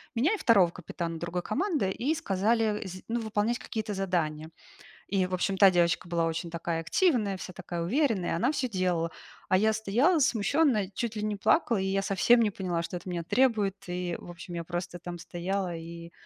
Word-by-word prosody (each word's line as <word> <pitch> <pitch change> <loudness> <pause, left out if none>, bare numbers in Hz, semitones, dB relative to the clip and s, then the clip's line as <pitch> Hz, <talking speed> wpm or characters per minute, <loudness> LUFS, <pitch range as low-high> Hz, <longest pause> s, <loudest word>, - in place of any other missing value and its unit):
меня 295 - +2
и - - -5
второго 200 - +5
капитана 170 -1 -5
другой 170 +1 -3
команды 295 - 0
и 280 +10 0
сказали 210 0 0
сд 185 +1 -8
ну 235 +1 -1
выполнять 220 +2 0
какие-то 220 -2 -4
задания. 160 -5 -1 0.6
И 190 -2 +1
в 185 - -10
общем 190 +2 0
та 195 -1 +7
девочка 175 0 +2
была 170 -1 +1
очень 165 +1 -3
такая 170 0 -2
активная, 210 - +1
вся 185 - -7
такая 175 -2 -5
уверенная, 225 - +1
и - - 0
она 240 +9 +1
всё 260 -4 -1
делала. 170 -2 +1 0.4
А 185 - +4
я 220 +3 +3
стояла 230 - +2
смущенно, 245 - +3
и 185 - -11
чуть 230 0 -3
ли 210 - -3
не 210 -1 -1
плакала, 230 - +2
и - - -1
я 195 0 0
совсем 215 +5 +4
не 220 - +3
поняла, 180 -4 -2
что 170 +2 -5
от - - -19
меня 175 -2 -3
требуют. 210 -1 +2
И 175 -1 -2
в 175 - -10
общем 175 +1 -9
я 170 -1 -4
просто 175 +1 -4
там 175 0 -7
стояла 180 +1 -3
и, 170 +1 -9
190 Hz, 205 wpm, -29 LUFS, 175-220 Hz, 0.6 s, та